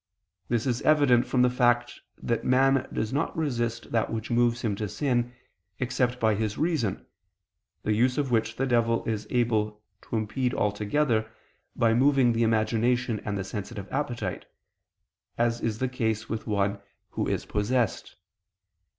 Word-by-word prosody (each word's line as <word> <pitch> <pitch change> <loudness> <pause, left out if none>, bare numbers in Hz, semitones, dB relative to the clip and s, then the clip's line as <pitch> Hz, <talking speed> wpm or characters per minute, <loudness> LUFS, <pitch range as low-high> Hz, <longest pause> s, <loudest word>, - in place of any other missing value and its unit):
This 120 0 0
is 125 -2 0
evident 140 -5 +4
from 125 -1 +2
the 125 - +5
fact 120 -1 +1 0.2
that 115 -1 -2
man 135 +1 +3
does 110 +2 -2
not 145 +4 -1
resist 120 -6 -2
that 115 -1 0
which 115 0 -4
moves 120 0 +2
him 105 -4 0
to 105 -1 -3
sin, 120 -3 0 0.5
except 125 -1 0
by 110 -2 +3
his 105 0 -2
reason; 155 - -1 0.8
the 105 - +1
use 125 +4 +2
of 140 -4 0
which 115 -1 +1
the 135 - 0
devil 115 -2 +1
is 110 -2 -3
able 110 -3 0 0.2
to - - -6
impede 120 +4 -1
altogether, 110 +3 0 0.5
by 115 -2 +3
moving 130 -1 +4
the 115 - 0
imagination 115 +1 +1
and 100 0 -4
the 100 - -2
sensitive 100 +1 -6
appetite; 120 -9 -3 0.9
as 120 0 +1
is 110 -2 -1
the 130 - 0
case 110 -3 -2
with 110 +1 -4
one 100 -1 0 0.3
who - - -2
is - - -1
possessed. 115 +2 -1
120 Hz, 155 wpm, -27 LUFS, 110-125 Hz, 0.9 s, the